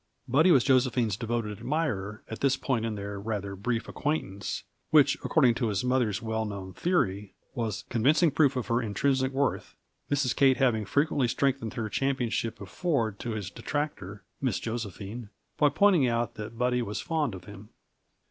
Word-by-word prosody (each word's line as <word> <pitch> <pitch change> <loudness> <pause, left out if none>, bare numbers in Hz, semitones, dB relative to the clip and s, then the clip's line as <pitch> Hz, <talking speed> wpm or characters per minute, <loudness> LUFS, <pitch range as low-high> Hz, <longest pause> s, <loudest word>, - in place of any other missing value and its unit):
Buddy 145 +8 +4
was 135 -8 +6
Josephine's 125 -5 +2
devoted 115 -1 -2
admirer, 110 -9 -2
at 110 - -7
this 140 0 +2
point 120 -5 -1
in 110 - -3
their 100 0 -5
rather 100 -2 -3
brief 115 +4 -2
acquaintance; 100 - -3 0.3
which, - - +6
according 120 - +4
to 120 0 -1
his 100 -1 -1
mother's 125 -5 +1
well 110 0 -1
known 100 -3 -6
theory, 105 - 0 0.2
was 115 -4 -3
convincing 150 +7 +3
proof 140 -1 +3
of 125 - -2
her 115 +1 +1
intrinsic 130 +5 +1
worth 135 0 -1 0.3
Mrs. 140 -4 +1
Kate 135 -2 +4
having 120 -6 +2
frequently 140 - +1
strengthened 130 -1 0
her 115 -4 -2
championship 120 -2 -1
of 100 - -9
Ford 115 - -1
to 120 - -3
his 105 -3 -4
detractor, 120 -9 -4 0.2
Miss 125 -7 0
Josephine, 110 -1 -5 0.3
by 145 - +5
pointing 170 -2 +4
out 120 0 0
that 110 +1 -8
Buddy 125 0 +1
was 105 -2 -3
fond 155 - -1
of 90 - -10
him. 100 +1 -11
120 Hz, 165 wpm, -28 LUFS, 105-135 Hz, 0.3 s, was